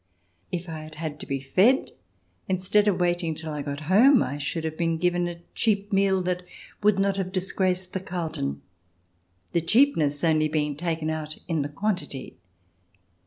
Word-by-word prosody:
If 175 0 -3
I 160 -1 -5
had 155 0 -10
had 155 -1 -5
to - - -7
be 135 0 -1
fed, 190 - +3 0.6
instead 190 +3 +2
of 190 -3 +2
waiting 175 -2 +1
till 160 0 -6
I 150 - -3
got 140 +1 -5
home, 230 - +6
I 145 +3 -4
should 160 +3 -2
have 160 -1 -3
been 165 0 0
given 175 +1 +1
a 170 0 -7
cheap 205 -2 +1
meal 195 -1 +3
that 180 0 -1 0.4
would 210 -1 +4
not 195 0 +1
have 185 -1 -2
dis 185 0 -2
graced 185 -1 0
the 190 - -1
Carlton, 160 - -4 0.9
the 170 - +1
cheapness 165 - +3
only 155 -2 +3
being 150 -1 -1
taken 160 0 -2
out 155 -1 -4
in 165 -3 0
the 140 - -3
quantity. 150 -6 -3
170 Hz, 175 wpm, -26 LUFS, 155-190 Hz, 0.9 s, home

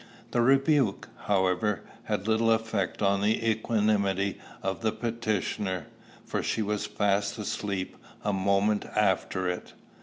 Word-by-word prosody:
The 120 - +2
rebuke, 135 -3 +3 0.2
however, 95 0 +1 0.2
had 100 - -2
little 115 +1 +3
effect 110 -4 0
on 100 0 +3
the 110 +2 +1
equanimity 105 -3 +1 0.2
of 95 0 -2
the 110 -1 +1
petitioner, 110 -6 -2 0.4
for - - -2
she 110 - 0
was 105 0 -1
fast 100 -1 0
asleep 100 -2 -3 0.3
a 105 - 0
moment 100 +2 +2
after 95 -2 +1
it. 90 0 -4
105 Hz, 125 wpm, -28 LUFS, 100-110 Hz, 0.4 s, rebuke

